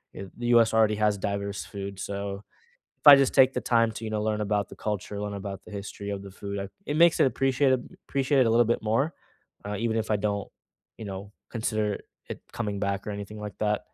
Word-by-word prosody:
eh, 95 - -6
the 120 0 -4
US 115 -2 +5
already 110 -1 +4
has 105 -1 +1
diverse 100 0 -3
food, 100 -1 -7
so, 100 0 -4 0.6
if - - -23
I 140 -1 +12
just 135 -1 +3
take 130 -1 +5
the - - 0
time 115 -1 +3
to, 110 - -7
you 110 - -3
know, 105 -1 -1
learn 105 0 0
about 105 -1 0
the - - -12
culture, 105 -1 -4
learn 105 0 -3
about 100 -1 -6
the - - -13
history 100 0 -6
of 100 -1 -4
the 100 - -9
food, 100 +1 -6
I 100 0 -4 0.2
it 145 - -2
makes 170 -1 +6
it - - +6
appreciate 135 +1 +2 0.3
appreciate 135 -1 +2
a 115 - +2
little 115 0 +4
bit 120 - 0
more, 115 +9 +1 0.5
uh, 105 0 -3
even 115 -1 0
if 110 0 -2
I 105 - +3
don't, 100 0 -2 0.5
you 110 - -7
know, 100 +1 -7 0.2
consider 110 -2 -1
it - - -8 0.3
it - - -7
coming 100 -1 -3
back 100 0 -2
or - - -3
anything 100 +1 -6
like 105 -1 -7
that. 105 -1 +1
105 Hz, 235 wpm, -27 LUFS, 100-115 Hz, 0.6 s, I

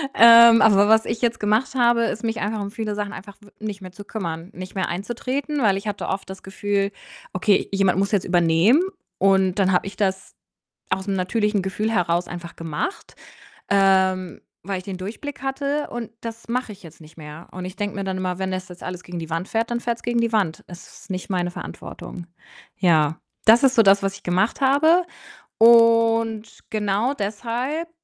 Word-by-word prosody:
Ähm, 230 0 +8
aber 205 -1 +5
was 220 0 +5
ich 225 +1 -4
jetzt 235 -1 0
gemacht 215 +6 +1
habe, 240 -2 +3
ist 220 - -4
mich 225 -1 -2
einfach 210 +1 -2
um 200 0 -5
viele 215 -2 -4
Sachen 205 -1 -4
einfach 200 +1 -10
w 205 - -18
nicht 210 -2 -6
mehr 185 -1 -9
zu 205 +2 -12
kümmern, 170 -5 -5
nicht 185 +2 -9
mehr 190 -2 -1
einzutreten, 255 - -3
weil 205 -5 +3
ich 205 +2 -7
hatte 205 - -4
oft 190 -1 -4
das 190 - -9
Gefühl: 200 +1 -2 0.4
„Okay, 195 +2 +2
jemand 195 -2 +2
muss 200 - 0
jetzt 195 - +1
übernehmen“, 175 - +3 0.4
und 190 0 +3
dann 190 -1 +3
habe 180 - +2
ich 195 - -9
das 190 -1 -2 0.6
aus 190 +1 -1
'nem 195 - 0
natürlichen 210 +2 0
Gefühl 210 +3 -2
heraus 175 -3 0
einfach 175 -1 -8
gemacht, 165 - -5 0.5
ähm, 190 -2 +2 0.2
weil 195 0 -3
ich 185 - -10
den 195 -2 -6
Durchblick 230 +9 -7
hatte 280 +2 -2
und 235 -2 -6
das 230 0 -8
mache 250 -2 -2
ich 200 -1 -15
jetzt 165 -1 -14
nicht 155 +1 -16
mehr 155 +2 -11
und 185 0 -7
ich 185 +1 -7
denke 205 -1 -4
mir 195 - -3
dann 190 -1 -3
immer: 185 0 -3
„Wenn 190 0 -2
das 185 0 -5
jetzt 180 0 -12
alles 180 0 -6
gegen 175 -1 -7
die 165 0 -8
Wand 165 +3 -3
fährt, 230 +1 -1
dann 235 0 -1
fährt's 235 -1 -3
gegen 240 0 0
die 230 -1 0
Wand. 185 -8 0
Es 175 -1 -13
ist - - -18
nicht 185 +2 -5
meine 180 -1 -1
Verantwortung.“ 175 0 -9 0.5
Ja, 160 -3 +2 0.3
das 230 +4 +7
ist 265 -1 +4
so 225 - +7
das, 195 0 +5
was 195 0 -1
ich - - -16
gemacht 185 +9 0
habe 315 +6 +4 0.5
und 230 -1 +4
genau 215 +4 0
deshalb 240 +10 -3
200 Hz, 200 wpm, -22 LUFS, 185-230 Hz, 0.6 s, Ähm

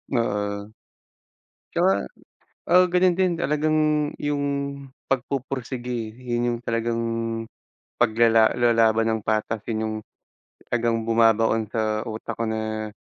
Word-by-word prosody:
Oo. 105 -2 -1 1.0
Tsaka, 95 -3 +2 0.7
ah, 180 +1 +7
ganun 180 0 +2
din 185 -2 +2
talagang 155 -1 +1 0.4
yung 145 -1 -1 0.7
pagpupursigi 125 -3 -3
yun 120 -1 -2
yung 120 - -4
talagang, 115 0 -1 1.0
paglala 115 -1 +5
lalaban 115 -2 +3
ng 110 -1 0
patas 110 0 -1
yun 110 -1 -1
yung 110 0 -3 0.8
talagang 115 -1 +1
bumabaon 115 -1 +3
sa 110 0 -1
utak 110 +1 -6
ko 115 - 0
na, 110 -1 -3
115 Hz, 105 wpm, -24 LUFS, 110-125 Hz, 1.0 s, ah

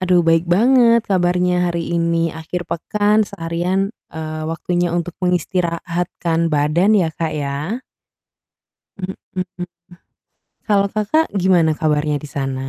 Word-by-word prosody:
Aduh 180 -1 +3
baik 165 0 +3
banget 235 +4 +5
kabarnya 180 -1 +2
hari 170 0 -3
ini. 165 -1 +1
Akhir 160 +2 -5
pekan 210 +5 +1
seharian, 180 +2 -2 0.2
eee, 155 0 -5
waktunya 175 +2 -1
untuk 175 0 -2
mengistirahatkan 170 -1 -1
badan 155 +6 +2
ya 175 -5 +2
Kak 160 0 -3
ya? 150 - -3 1.5
Mhm. 180 -1 -4 1.0
Kalau 200 -2 +3
kakak 215 +10 +2 0.2
gimana 175 -4 +4
kabarnya 150 -1 +1
di 145 - -7
sana? 135 -1 -3
175 Hz, 115 wpm, -19 LUFS, 160-185 Hz, 1.5 s, banget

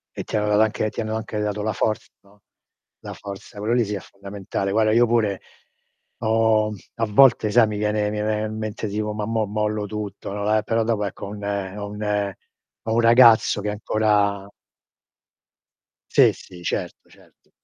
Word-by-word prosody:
E - - -4
ti - - -3
ha 105 - 0
dato 105 0 +3
anche 110 0 +1
ti - - -4
hanno 110 0 -3
anche 110 -1 -4
dato 105 0 -2
la 110 -1 -1
forza, 110 +3 -1
no. 100 +1 -25 0.6
La - - -8
forza, 100 0 -10
quello 110 +3 0
lì 120 -2 +3
sì, 105 - -4
è 100 - -2
fondamentale. 100 0 -5
Guarda, 110 0 +3
io 120 +1 +5
pure 110 -4 0 0.8
ho 110 -1 +2 0.3
a 115 -1 0
volte 110 0 +5
sai, 120 +1 +5
mi 105 -1 -4
viene 105 0 0
mi 105 0 -3
viene 105 0 -1
in 110 0 -5
mente 110 0 -4
tipo, 105 +1 -3
"ma 105 0 -3
mò 110 -1 0
mollo 105 0 -2
tutto", 105 -1 -6
no, 105 +1 0
eh, 105 - +1
però 115 +1 0
dopo 110 -2 0
ecco, 100 - -6
ho - - -7
un 105 0 -8
ho 100 0 -4
un 105 -1 -2 0.5
ho 110 - -3
un 115 - +3
ragazzo 115 -2 +6
che 105 - -2
ancora 105 -1 0 1.6
Sì, - - +5
sì, 90 -1 -13
certo, - - -4
certo. - - -24
105 Hz, 185 wpm, -23 LUFS, 105-110 Hz, 1.6 s, ragazzo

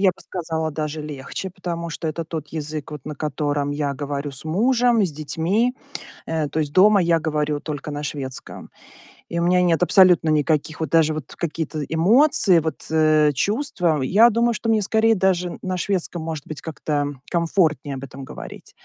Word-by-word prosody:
Я 195 -1 +5
бы 185 - -16
сказала 160 -3 -3
даже 155 0 -4
легче, 150 +5 -6
потому 170 -2 -5
что 160 +1 -5
это 160 +2 -3
тот 155 -2 -6
язык, 155 -1 -5
вот 150 -3 -8
на 150 -1 -6
котором 145 0 -1
я 145 -1 -2
говорю 145 +1 -4
с 135 +1 -9
мужем, 235 +6 +2
с 180 - -2
детьми. 165 - 0 0.5
Э, 160 -2 -1
то 145 - -3
есть 145 -2 -2
дома 200 +4 +6
я 170 -1 +2
говорю 150 -1 -1
только 150 -1 -5
на 145 0 -4
шведском. 135 -3 -6 0.6
И 170 - -2
у - - +1
меня 180 +1 +3
нет 175 -1 +2
абсолютно 180 -3 +5
никаких, 155 +1 +1
вот 160 - -2
даже 160 0 +3
вот 155 -3 -7
какие-то 160 -1 -3
эмоции, 195 - +4
вот, 160 0 -5
э, 155 -1 +4
чувства. 180 - 0
Я 205 - +5
думаю, 235 +1 +2
что 225 - -5
мне 220 -2 +3
скорее 220 +2 +3
даже 180 -2 0
на 185 -1 -3
шведском, 180 -3 -2
может 160 -3 -5
быть, 155 - -7
как-то 150 -2 -2 0.2
комфортнее 165 -4 +1
об 135 - -7
этом 135 0 -9
говорить. - - -10
160 Hz, 180 wpm, -22 LUFS, 150-185 Hz, 0.6 s, дома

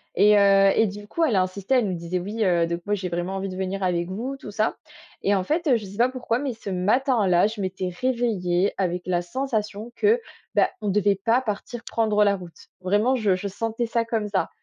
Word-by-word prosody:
Et 210 0 +6
heu 195 0 +5
et 225 - +4
du 205 +1 -8
coup, 335 +9 -1
elle 255 -9 +2
a 190 - +4
insisté. 195 +6 -2
Elle 240 -5 +3
nous 185 - -2
disait: 170 +2 -3
«Oui, 210 +5 -3
heu, 175 -3 +3
donc 170 0 -3
moi, 205 - +2
j'ai 185 -2 -4
vraiment 175 +3 -3
envie 195 0 -3
de 185 - -6
venir 190 +1 -3
avec 175 -1 0
vous», 250 +8 -4
tout 215 - -10
ça. 215 +2 0 0.5
Et 200 - +2
en 190 - 0
fait, 320 - -1
heu, 250 - +5
je 215 - -7
sais 195 +1 -10
pas 245 +2 +4
pourquoi, 245 -2 -2
mais 275 -3 -2
ce 220 -2 -8
matin-là, 200 -1 +2
je 215 -1 -6
m'étais 185 -1 -3
réveillée 205 -8 +1
avec 180 -2 -1
la 175 -1 0
sensation 220 +1 -3
que, 440 +3 +3 0.4
bah, - - +4
on 210 - -1
devait 200 0 +2
pas 230 +6 +1
partir 225 +1 -5
prendre 215 -2 +2
la 200 -1 +3
route. 180 -3 -12
Vraiment, 210 +8 +2
je 210 -6 +2
je 185 +2 -4
sentais 225 +4 -2
ça 230 0 0
comme 220 -2 -2
ça, 195 -2 0
205 Hz, 235 wpm, -24 LUFS, 185-230 Hz, 0.5 s, Et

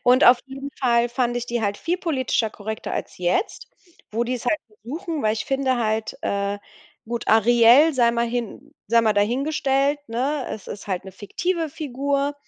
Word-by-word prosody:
Und 250 +1 +5
auf 245 0 +8
jeden 270 +1 -7
Fall 240 -2 +3
fand 240 0 -1
ich 240 0 -3
die 235 -1 -2
halt 200 0 0
viel 345 +2 -1
politischer 260 - 0
korrekter 220 +1 -6
als - - -5
jetzt, 180 - -1 0.4
wo 230 +2 0
die's 250 0 -3
halt 310 - +2
versuchen, 295 - -6
weil 215 - +2
ich 220 - -4
finde 270 -1 0
halt, 220 -1 -1
äh, 200 0 -1 0.5
gut, 235 0 -4
Ariel 240 +7 +6
sei 235 -2 +4
mal 235 0 0
hin 235 -2 -5
sei 235 +1 +5
mal 220 -2 +3
dahingestellt, 275 +5 +1
ne, 260 +4 -1
es 210 - -7
ist 200 - -8
halt 190 -1 -3
'ne 190 - -10
fiktive 330 - -2
Figur, 280 -1 -2
240 Hz, 180 wpm, -23 LUFS, 220-275 Hz, 0.5 s, auf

